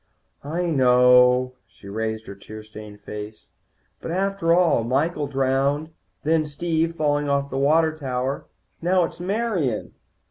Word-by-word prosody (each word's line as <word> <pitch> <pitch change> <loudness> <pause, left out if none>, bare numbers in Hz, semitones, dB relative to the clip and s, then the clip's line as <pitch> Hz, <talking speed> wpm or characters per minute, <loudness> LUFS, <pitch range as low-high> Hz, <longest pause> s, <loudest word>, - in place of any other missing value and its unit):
"I 165 +5 -2
know." 125 -3 +5
She 100 - -16
raised 110 +2 -3
her - - -8
tear 110 +2 -11
stained 105 -1 -11
face. 105 +1 -8 0.6
"But - - -6
after 195 -1 0
all 170 -8 +4
Michael, 145 +5 0
drowned. 140 +3 0 0.3
Then 160 +1 +2
Steve, 165 +2 -1
falling 145 -2 0
off 140 0 0
the 135 - -3
water 155 +3 +3
tower. 130 -2 -3 0.3
Now 180 +2 +3
it's 165 - -5
Marian." 185 - -1
140 Hz, 135 wpm, -23 LUFS, 125-165 Hz, 0.6 s, know